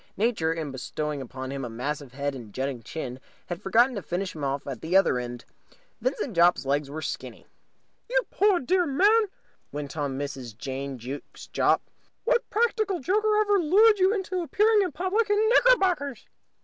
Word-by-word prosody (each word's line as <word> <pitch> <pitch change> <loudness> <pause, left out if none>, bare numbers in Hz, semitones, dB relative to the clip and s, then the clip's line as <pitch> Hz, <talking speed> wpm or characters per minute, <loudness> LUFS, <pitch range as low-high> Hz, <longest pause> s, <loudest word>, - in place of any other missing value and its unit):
Nature, 205 -7 +1
in 160 -3 -3
bestowing 145 +2 -4
upon 130 +1 -6
him 140 -1 -4
a 120 - -4
massive 135 +3 -4
head 140 +1 -2
and 120 -5 -9
a - - -17
jutting 130 +1 -3
chin, 130 -1 -6 0.3
had 175 -1 -6
forgotten 240 +6 +3
to 205 - -4
finish 180 +2 -3
him 150 - -7
off 140 0 -2
at 135 -4 -6
the 175 +4 +3
other 195 -10 +3
end. 120 -1 -6 0.6
Vincent 430 - -2
Jopp's 170 -5 +4
legs 140 +1 0
were 155 +2 -6
skinny. - - -6 0.6
"You - - +3
poor 400 -3 +3
dear 355 +5 +1
man!" 410 +11 +4 0.5
went 145 -1 -6
on 140 -3 -2
Mrs. 135 -6 -6
Jane 135 +2 -5
Jukes 130 +4 -8
Jopp. - - +2 0.4
"What - - +1
practical 435 -4 +1
joker 425 +7 +2
ever 410 -1 +3
lured 410 +6 +5
you 375 +1 +4
into 380 -3 -2
appearing 420 +5 +3
in 370 - 0
public 410 +5 0
in 415 - +3
knickerbockers?" 370 - +3
175 Hz, 175 wpm, -26 LUFS, -, 0.6 s, lured